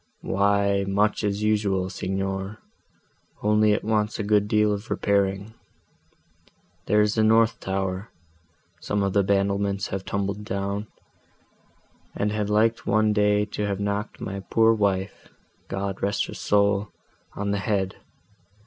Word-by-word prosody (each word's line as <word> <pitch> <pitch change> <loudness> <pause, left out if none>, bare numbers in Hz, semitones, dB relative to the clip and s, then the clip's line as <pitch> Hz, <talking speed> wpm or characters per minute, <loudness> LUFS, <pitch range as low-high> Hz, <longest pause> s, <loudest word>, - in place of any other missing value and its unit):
"Why 100 0 +2
much 105 +3 +1
as 105 0 -1
usual, 100 -3 +1
Signor, 95 +2 -3 0.9
only 105 0 +4
it 105 - 0
wants 105 0 0
a 110 - -2
good 105 0 +2
deal 105 0 +3
of 100 +3 -6
repairing. 100 +1 0 1.3
There 105 +2 +4
is 105 0 +2
the 110 - +2
north 110 +1 +4
tower—some 95 -1 -5
of 100 -1 0
the 100 - +4
battlements 100 0 0
have 95 0 -4
tumbled 100 +1 -3
down, 100 0 -3 1.3
and 105 +1 0
had 105 -1 -2
liked 110 +2 +2
one 110 0 +3
day 105 0 +3
to 105 - -1
have 100 -1 -2
knocked 100 +1 -3
my 100 +1 -5
poor 115 +3 +3
wife 100 -2 -1 0.4
(God 95 0 -4
rest 100 +1 0
her - - -8
soul!) 100 0 +1 0.4
on 100 0 -2
the 100 - 0
head. 100 -2 -1
100 Hz, 135 wpm, -25 LUFS, 100-105 Hz, 1.3 s, only